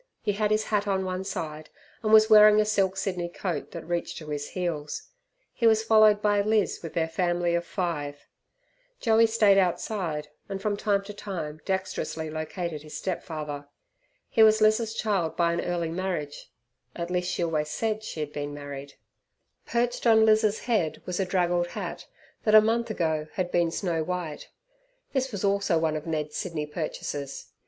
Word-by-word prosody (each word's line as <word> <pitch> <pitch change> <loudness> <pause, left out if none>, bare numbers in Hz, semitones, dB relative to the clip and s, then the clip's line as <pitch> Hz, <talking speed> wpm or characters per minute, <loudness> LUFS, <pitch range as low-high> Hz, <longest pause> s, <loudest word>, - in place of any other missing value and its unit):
He 210 - +1
had 210 +1 0
his 215 0 +2
hat 210 -1 0
on 190 -1 0
one 185 0 -3
side, 155 -5 -5 0.3
and 215 -2 0
was 220 0 +8
wearing 215 -1 +8
a 215 - +3
silk 195 -3 +1
Sydney 180 -3 -2
coat 175 -4 -4
that 170 -2 -8
reached 175 0 -2
to 155 -2 -8
his 145 -1 -4
heels. 165 -5 -3 0.5
He 230 - +2
was 220 -1 +4
followed 215 -2 +5
by 205 -1 +3
Liz 215 0 +1
with 165 - -8
their 160 -1 +1
family 175 +1 0
of 170 0 -1
five 150 -6 -3 0.7
Joey 225 -1 +4
stayed 210 -3 +4
outside, 175 -4 -1 0.2
and 195 -1 -3
from 205 +1 -1
time 200 -1 +1
to 205 +1 -8
time 165 -7 -6
dexterously 185 -4 -3
located 155 0 -4
his 150 0 -8
step 185 -3 -3
father. 150 -3 -6 0.6
He 225 - +2
was 220 0 +7
Liz's 215 +1 +3
child 195 -8 -1
by 170 -1 +2
an 170 - -1
early 170 -2 -2
marriage 170 -5 -4 0.5
at 170 0 -4
least, 180 0 0
she - - -1
always 155 -2 -1
said 220 +4 -2
she 160 - -5
had 150 0 -4
been 145 0 -4
married. 140 -1 -8 0.7
Perched 240 +1 0
on 220 -1 +6
Liz's 215 -1 +3
head 215 -10 0
was 180 0 -3
a 195 - +1
draggled 175 -1 +1
hat - - -6 0.4
that 215 -1 +4
a - - +12
month 230 +2 0
ago 160 -6 -1
had 180 -2 -2
been 170 -1 +2
snow 165 -1 -1
white. 175 -3 -4 0.6
This 265 -1 0
also 200 -2 +2
was 160 - +2
one 155 -1 +1
of 155 +1 -5
Ned's 155 -2 -2
Sydney 165 -5 -3
purchases. 150 -2 -5
180 Hz, 180 wpm, -27 LUFS, 160-210 Hz, 0.7 s, a